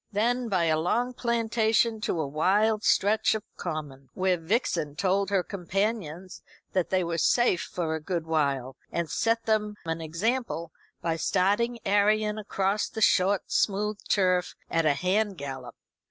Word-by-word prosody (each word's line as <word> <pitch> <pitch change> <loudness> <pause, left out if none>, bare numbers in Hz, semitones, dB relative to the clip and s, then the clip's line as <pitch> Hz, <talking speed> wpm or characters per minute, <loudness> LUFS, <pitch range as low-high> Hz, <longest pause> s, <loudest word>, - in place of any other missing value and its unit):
Then 235 +3 0
by 185 -4 +1
a 160 -1 +2
long 240 +9 0
plantation 230 -1 +1
to 175 - -1
a 155 - 0
wild 205 +9 +2
stretch 215 +2 +3
of 215 - -4
common, 145 -6 -6
where 185 -1 +2
Vixen 165 - -1
told 195 +3 +1
her 195 -2 +2
companions 190 -2 -3 0.3
that 185 -2 0
they 185 -1 +1
were 170 -1 -2
safe 240 -1 +3
for 165 -3 -3
a 160 - -3
good 170 0 -3
while, 140 -5 0 0.2
and 170 -2 -2
set 230 0 0
them 210 -1 0
an 165 0 -3
example 170 +1 -2 0.3
by 165 -1 0
starting 205 +8 +1
Arion 210 +1 +2
across 200 0 -1
the 220 - -6
short 200 -1 +3
smooth 210 +1 0
turf 185 -2 +2 0.2
at 165 -1 +2
a 145 - +4
hand 195 +4 0
gallop. 135 -4 -7
190 Hz, 155 wpm, -27 LUFS, 165-215 Hz, 0.3 s, a